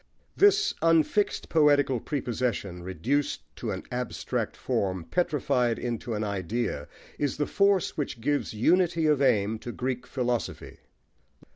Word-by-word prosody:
This 410 0 +4
unfixed 165 +5 +2
poetical 145 -5 +3
prepossession, 120 - -2
reduced 110 - -1
to - - -4
an - - -3
abstract 125 0 -3
form, 95 -3 -1
petrified 125 - +1
into 120 -1 -3
an 105 - -2
idea, 100 -4 -2 0.3
is 145 -3 -1
the 145 - +1
force 200 +1 +2
which 135 -6 -3
gives 145 +5 0
unity 165 - +2
of 150 -2 +3
aim 110 -4 +2
to 120 - -6
Greek 125 0 -3
philosophy. 125 -3 -3
125 Hz, 125 wpm, -27 LUFS, 110-150 Hz, 0.3 s, This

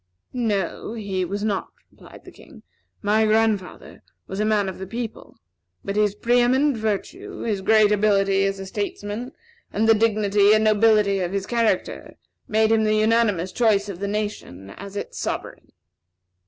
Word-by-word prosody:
"No; 215 -4 -2
he 200 -4 -3
was 200 +3 -4
not," 205 -3 -1 0.2
replied - - -16
the - - -12
King. - - -17 0.4
"My 215 +2 +3
grandfather 215 -3 -1 0.2
was 190 - -6
a 215 - +1
man 210 -2 +1
of 190 - -6
the 190 - -6
people; 230 +1 -7 0.5
but 200 - -3
his 210 -1 +1
pre 240 +3 +2
eminent 260 +3 +2
virtue, 225 - -4
his 210 -4 -2
great 215 +1 +4
ability 195 -2 +2
as 195 0 -1
a 195 - -7
statesman, 205 +4 -5 0.4
and 220 +2 0
the 225 - +7
dignity 210 -2 +3
and 215 - +2
nobility 215 -2 +3
of 180 0 -3
his 200 -1 -2
character 230 0 -1 0.3
made 220 0 +2
him 220 -1 +3
the 215 0 +2
unanimous 215 -5 +1
choice 210 -2 +1
of 185 -3 -7
the 200 - -3
nation 200 - -5
as 200 - -10
its 205 - -6
sovereign." - - -5
210 Hz, 165 wpm, -23 LUFS, 200-220 Hz, 0.5 s, the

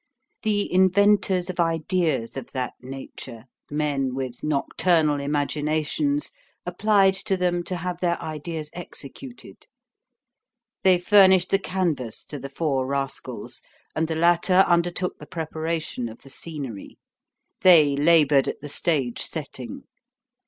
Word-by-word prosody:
The 205 -3 0
inventors 190 0 +3
of 180 - -13
ideas 165 -6 0
of 135 -3 -7
that 130 -2 -2
nature, 125 -3 -9 0.2
men 145 -3 -1
with 130 -2 -5
nocturnal 150 +1 +1
imaginations, 150 - -1 0.3
applied 200 -3 +3
to 190 0 -1
them 175 -1 0
to 180 - -2
have 180 0 -4
their 175 -1 0
ideas 155 0 -6
executed. 180 - -9 1.1
They 185 -1 +5
furnished 190 -1 +5
the 195 - +4
canvas 170 - -2
to 145 - -7
the 140 +1 -7
four 135 -3 -1
rascals, 135 -1 -4 0.3
and 160 +1 0
the 160 - -2
latter 175 +3 +4
undertook 175 +1 0
the 150 - -11
preparation 160 -5 -3
of 110 - -13
the 135 - -12
scenery. 135 -10 -7 0.6
They 155 -6 +6
labored 150 -2 +4
at - - -3
the 145 - -8
stage 140 -5 0
setting. - - -6
160 Hz, 125 wpm, -24 LUFS, 140-180 Hz, 1.1 s, They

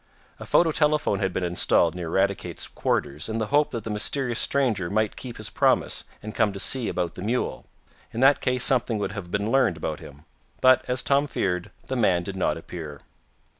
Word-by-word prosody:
A - - -9
photo 165 -2 +3
telephone 150 -9 +1
had 95 -2 -1
been 90 - -3
installed 85 -1 +3
near 90 -2 -5
Eradicate's 95 -1 -1
quarters, 75 +8 -2
in 110 - -2
the 110 - -1
hope 150 +1 +4
that 115 -3 -5
the 110 - -5
mysterious 120 +3 0
stranger 115 -11 +1
might 110 +1 0
keep 125 -2 -8
his 110 -1 -5
promise, - - +1 0.2
and 105 0 -7
come 105 - +1
to 100 - -7
see 125 +3 +2
about 90 -2 -2
the - - -9
mule. 115 +6 -2 0.4
In 115 - -5
that 135 +1 +5
case 125 -1 +1
something 120 -3 +2
would 105 - -3
have 100 -4 -7
been 100 +4 -2
learned 130 -11 +2
about 75 0 -4
him. 70 +1 -13 0.3
But, 130 -1 +5
as 125 0 0
Tom 140 +1 +2
feared, 90 -8 -2 0.2
the 130 - -4
man 95 -8 +2
did 95 +2 -6
not 90 -5 0
appear. 80 -3 -9
105 Hz, 205 wpm, -25 LUFS, 90-125 Hz, 0.4 s, that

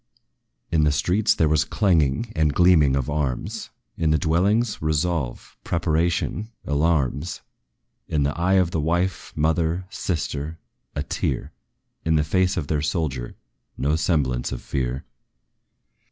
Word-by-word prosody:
In 80 -2 +3
the 75 - +4
streets 90 +9 +2
there 80 - +3
was 75 +1 +3
clanging 85 - +1
and 75 -2 +2
gleaming 80 -6 +5
of 70 -3 -1
arms; 70 -4 -2 0.3
In 80 -1 +1
the 80 - +4
dwellings, 100 +8 +1
resolve, 80 -4 -1
preparation, 85 +5 0 0.2
alarms; 75 0 0 0.7
In 75 -2 +1
the 70 0 0
eye 90 +3 +2
of 90 -3 +3
the 80 - 0
wife, 85 +4 -1
mother, 80 +3 +1
sister, 80 -2 -3 0.4
a - - -1
tear; 75 - -2 0.5
In 80 -1 +2
the 75 - +3
face 90 +5 +1
of 80 - -1
their 75 0 0
soldier, 75 -6 -2 0.4
no 75 +3 +1
semblance 70 -7 0
of - - -5
fear. 65 0 -2
80 Hz, 135 wpm, -24 LUFS, 75-85 Hz, 0.7 s, gleaming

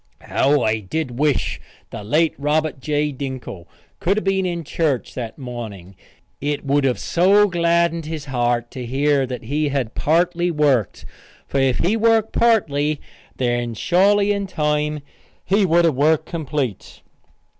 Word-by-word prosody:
'" - - -41
How 140 -1 +3
I 110 0 +1
did 125 +5 -4
wish 150 -2 0 0.3
the - - -7
late 155 +9 +2
Robert 150 0 0
J. 150 +2 -1
Dinkle 130 -10 -7 0.3
could 195 +4 +1
have 215 - -1
been 190 -1 +1
in 170 -1 -3
church 150 -4 -1
that 115 -3 -6
morning. 110 -8 -8 0.5
It 145 0 -2
would 140 0 +2
have 130 -2 +1
so 200 +4 +3
gladdened 170 -2 +1
his 155 -3 -5
heart 120 -3 -1
to 130 - -6
hear 135 +2 +1
that 125 -1 -6
he 145 +5 -1
had 135 -5 -2
partly 175 +2 +1
worked, 145 - +1 0.4
for 140 - -1
if 135 -2 +2
he 195 +6 +1
worked 225 -1 +2
partly, 155 -11 +2 0.4
then 120 -2 -1
surely, 200 - +3
in 200 -1 -1
time, 150 -2 -1 0.4
he 200 0 +2
would 170 +1 +4
have 165 - +3
worked 150 +4 +2
complete. 145 - -4
150 Hz, 155 wpm, -21 LUFS, 130-170 Hz, 0.5 s, would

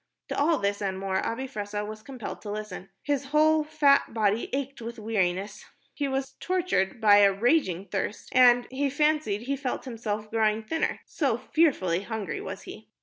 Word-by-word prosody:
To - - -2
all 315 +3 +3
this 200 0 -1
and 190 -2 -2
more, 190 0 -1
Abi 240 +4 -2
Fressah 210 -3 -4
was 215 0 -8
compelled 250 -1 -7
to 210 - -7
listen. 205 -2 -6
His 285 -2 -1
whole 310 +2 +3
fat 285 -5 +3
body 215 0 +1
ached 275 -1 -3
with 235 +1 -6
weariness, 205 -2 -1 0.3
he 285 - -2
was 270 0 -2
tortured 345 - 0
by 210 -2 +6
a 200 -1 +6
raging 200 - +1
thirst, 200 +2 -4
and 245 -1 +6
he 275 +2 0
fancied 300 -7 +1
he 275 +3 -1
felt 270 -1 -4
himself 215 -3 -4
growing 220 -1 +1
thinner 320 +9 -2
so - - 0
fearfully 190 - +1
hungry 205 -6 -4
was - - -7
he. - - -11
225 Hz, 175 wpm, -27 LUFS, 205-275 Hz, 0.3 s, by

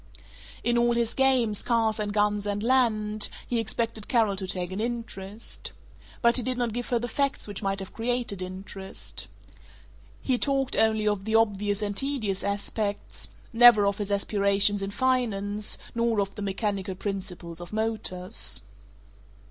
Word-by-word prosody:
In 240 0 +2
all 240 0 +3
his 235 -1 0
games, 255 -6 +2
cars 225 -2 +1
and 210 -1 -1
guns 205 0 +1
and 205 0 -2
land, 215 -4 +2 0.2
he 240 - -1
expected 225 -1 -2
Carol 225 -5 +2
to 190 -1 -3
take 180 -1 -1
an 190 - -4
interest. 225 -3 -4 0.5
But 235 +1 +5
he - - +5
did 255 +1 -2
not 240 -3 -1
give 245 +1 -4
her 245 - +2
the 240 +1 -2
facts 275 +1 -1
which 205 -2 -5
might 195 -1 -1
have 195 - -7
created 235 -4 -1
interest. 190 +1 -6 0.9
He 255 -2 0
talked 275 -1 +1
only 220 -1 +2
of 205 -2 0
the 220 0 0
obvious 205 -2 +2
and 205 -1 -2
tedious 225 -7 -1
aspects; 200 +1 -3 0.2
never 230 -3 +8
of 200 +1 0
his 205 -1 -3
aspirations 200 0 +3
in 195 - -2
finance, 210 -4 0 0.2
nor 230 -2 +1
of 200 0 -1
the 210 - -7
mechanical 200 -1 -2
principles 180 -4 -5
of 175 - -9
motors. 215 -3 0
210 Hz, 155 wpm, -27 LUFS, 200-235 Hz, 0.9 s, never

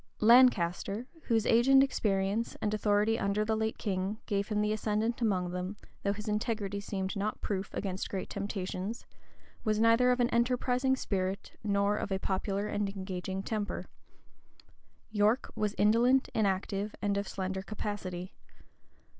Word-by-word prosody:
Lancaster, 215 -3 +4 0.2
whose 225 -3 +2
age 235 +2 +4
and 270 0 +7
experience, 210 -3 0
and 210 0 -1
authority 210 +1 +2
under 200 +2 0
the 220 0 +1
late 220 0 -1
king, 195 0 -2
gave 200 0 -1
him 210 -1 -1
the 210 0 +1
ascendant 215 +2 -1
among 185 -6 +1
them, 180 +3 -4 0.2
though 200 - +1
his 210 +2 -6
integrity 210 -2 -1
seemed 195 0 -3
not 205 +2 -2
proof 195 -1 -3
against 190 -1 -3
great 190 - -3
temptations, 195 +1 -4 0.6
was 215 -1 +1
neither 230 +2 +5
of 250 0 +2
an 240 0 +2
enterprising 250 +2 +2
spirit, 195 -4 -2
nor 200 0 +2
of 205 - -4
a 190 - +1
popular 195 +1 -1
and 205 -1 -1
engaging 190 0 -4
temper. 215 -1 -3 1.3
York 215 +4 +2
was 210 -1 -1
indolent, 240 +5 +4
inactive, 200 0 0
and 205 -1 0
of 200 +1 -2
slender 190 0 -3
capacity. 195 -3 -5
210 Hz, 145 wpm, -31 LUFS, 195-225 Hz, 1.3 s, and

